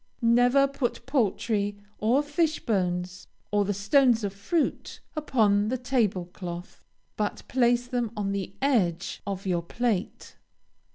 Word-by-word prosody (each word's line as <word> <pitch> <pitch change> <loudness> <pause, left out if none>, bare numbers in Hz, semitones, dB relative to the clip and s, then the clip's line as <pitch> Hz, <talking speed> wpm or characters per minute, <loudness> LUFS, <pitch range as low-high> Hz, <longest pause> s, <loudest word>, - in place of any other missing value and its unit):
Never 245 +4 +5
put 275 -3 -3
poultry 215 -5 0 0.2
or 245 +7 +3
fish 310 +2 0
bones, 180 -3 -1 0.2
or 205 -1 +2
the 205 - 0
stones 230 +3 +3
of 200 -1 -2
fruit, 285 - -2 0.2
upon 215 -9 +2
the 255 +3 0
table 235 -8 0
cloth, 175 -2 -7 0.3
but 210 -1 -2
place 245 -1 +2
them 245 -2 -1
on 200 -1 -1
the 195 0 -4
edge 195 -10 +1
of 195 -1 -4
your 175 -3 +1
plate. 210 +2 -3
220 Hz, 130 wpm, -27 LUFS, 195-250 Hz, 0.3 s, Never